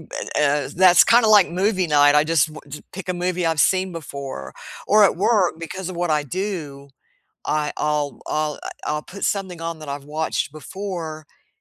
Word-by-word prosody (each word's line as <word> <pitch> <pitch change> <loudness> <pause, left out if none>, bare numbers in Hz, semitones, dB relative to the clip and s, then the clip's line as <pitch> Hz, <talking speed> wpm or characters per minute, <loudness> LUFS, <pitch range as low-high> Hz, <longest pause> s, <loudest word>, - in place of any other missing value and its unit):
eh, - - -3 0.2
uh, 145 -1 +1
b - - -11
a - - -19
that's 180 0 +7
kinda 235 -1 +4
like 205 -3 +6
movie 190 0 +1
night, 145 -1 +5
I 150 - +5
just 160 -2 +2
w 155 - -10
ju 145 +1 -9
pick 190 0 -8
a - - +1
movie 180 0 -2
I've 165 -2 0
seen 185 0 -2
before 140 - -7 0.3
or 210 +1 +6
at - - +1
work, 190 -3 +1
because 175 +3 -6
of 185 - -7
what 175 0 -1
I 150 -1 +1
do, 150 -5 -5 0.6
I 150 -1 0
I'll 150 -1 -1
I'll, 155 -1 -1
uh, - - -5 0.2
I'll 150 0 -2
put 200 - -7
something 190 -4 -2
on 165 -1 -4
that 155 -2 -9
I've 140 0 -5
watched 160 -2 -1
before, 160 -1 -6
i - - -35
165 Hz, 205 wpm, -22 LUFS, 150-185 Hz, 0.6 s, that's